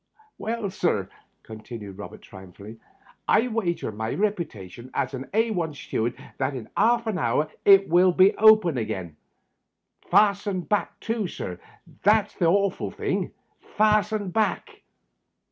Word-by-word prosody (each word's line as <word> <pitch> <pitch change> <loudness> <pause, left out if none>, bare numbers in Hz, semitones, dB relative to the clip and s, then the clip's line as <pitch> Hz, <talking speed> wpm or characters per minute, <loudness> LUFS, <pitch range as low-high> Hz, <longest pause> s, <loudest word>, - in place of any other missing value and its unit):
"Well, 225 -3 -3
sir," - - -1 0.3
continued 110 -3 -9
Robert, 105 - -9
triumphantly, 100 +3 -12 0.5
"I 225 +4 +3
wager 185 - -2
my 110 +2 -4
reputation 130 - -4
as - - -1
a 130 +1 -6
Al 200 -8 0
steward, 120 -3 -3 0.2
that 135 +1 -1
in 115 -4 -7
'arf 235 +1 +3
an 215 -5 -2
hour 140 +4 0 0.2
it 195 -1 +7
will 180 +2 +5
be 190 +3 +4
open 215 - +5
again; 95 -7 -5 0.9
fastened 200 -3 +2
back, 210 - -1
too, 225 -3 -2
sir, 90 - -6 0.4
that's 210 +1 +3
the 175 - -1
horful 200 +2 +1
thing - - -2 0.2
— - - -26
^fastened 210 -2 +2
back!" 220 -1 -1
180 Hz, 130 wpm, -25 LUFS, -, 0.9 s, it